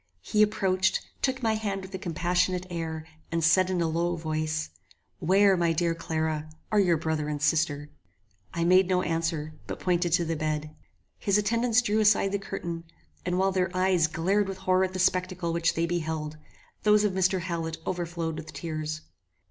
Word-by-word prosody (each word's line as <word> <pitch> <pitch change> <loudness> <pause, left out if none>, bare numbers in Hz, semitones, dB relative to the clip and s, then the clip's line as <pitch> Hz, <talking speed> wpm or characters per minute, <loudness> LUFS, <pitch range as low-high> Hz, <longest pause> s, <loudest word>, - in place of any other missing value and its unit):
He 210 - +1
approached, 190 -3 +2 0.2
took 265 -1 0
my 225 -1 +3
hand 200 -3 -2
with 190 +1 -10
a 190 - -4
compassionate 180 +1 0
air, 160 -2 -4 0.3
and 165 0 0
said 180 +3 +4
in 180 -2 0
a 165 - +2
low 170 +2 0
voice, 155 - -2 0.5
"Where, 195 +3 +4
my 170 -2 +2
dear 170 +1 +1
Clara, 160 -1 -2 0.2
are 210 - +4
your 175 -4 +4
brother 155 -1 -2
and 150 -1 -2
sister?" 150 -1 +1 0.6
I 170 - -1
made 185 +2 +5
no 185 -1 +2
answer, 165 -2 -1
but - - -5
pointed 175 -1 +1
to 170 0 +3
the 165 0 -1
bed. 155 0 -3 0.4
His 200 0 +2
attendants 230 +3 +2
drew 215 -1 +1
aside 210 -2 +4
the 200 - 0
curtain, 170 -3 -5 0.4
and 180 0 +1
while 190 +1 +2
their 185 -1 +1
eyes 185 -3 +3
glared 190 +6 +1
with 195 -1 -5
horror 185 0 +2
at 185 - -6
the - - -3
spectacle 185 -2 0
which 170 0 +1
they 165 - +1
beheld, 160 -3 -2 0.5
those 210 0 +4
of 205 -2 +1
Mr. 185 0 +2
Hallet 165 -2 -3
overflowed 170 -2 -3
with 155 0 -9
tears. 155 0 -4
175 Hz, 180 wpm, -27 LUFS, 160-190 Hz, 0.6 s, made